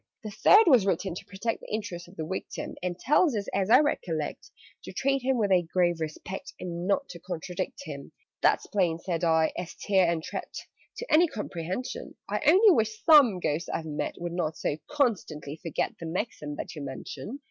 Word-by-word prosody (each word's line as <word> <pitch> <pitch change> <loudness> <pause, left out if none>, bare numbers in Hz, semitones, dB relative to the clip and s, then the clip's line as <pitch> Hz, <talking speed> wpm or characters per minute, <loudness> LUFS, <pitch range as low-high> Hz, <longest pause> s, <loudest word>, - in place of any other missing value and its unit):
"The 215 - -5
Third 410 - +6
was 250 - +5
written 190 0 0
to 180 - -8
protect 215 +4 -3
The - - -11
interests 180 -5 -4
of 175 - -16
the 160 - -4
Victim, 190 +4 -5
And 180 -1 -3
tells 295 - +3
us, 200 - -3
as 195 0 0
I 250 +5 +8
recollect, 165 - -2 0.4
To - - -7
treat 275 0 0
him 260 +1 +1
with 205 -4 +1
a 185 -1 +5
grave 175 0 +1
respect, 160 +4 -6
And 175 0 -4
not 275 +8 +1
to 170 - -9
contradict 180 +2 -5
him." 145 -5 -8 0.3
"That's - - +3
plain," 175 -5 +1
said 170 0 -3
I, 160 -1 +3
"as 175 -1 -6
Tare 190 -4 +2
and 165 -2 -2
Tret, - - -6 0.4
To 485 - -4
any 335 +3 +6
comprehension: 210 - -5
I - - -2
only 390 +7 +7
wish 220 -7 0
some 280 - +7
Ghosts 160 0 -2
I've 160 - -3
met 150 -1 -3
Would 175 0 -4
not 160 -3 -2
so - - -1
constantly 180 - -1
forget 165 -2 -2
The 165 - -6
maxim 160 -4 -4
that - - -6
you 150 - -6
mention!" 140 - -7
185 Hz, 195 wpm, -28 LUFS, 165-230 Hz, 0.4 s, I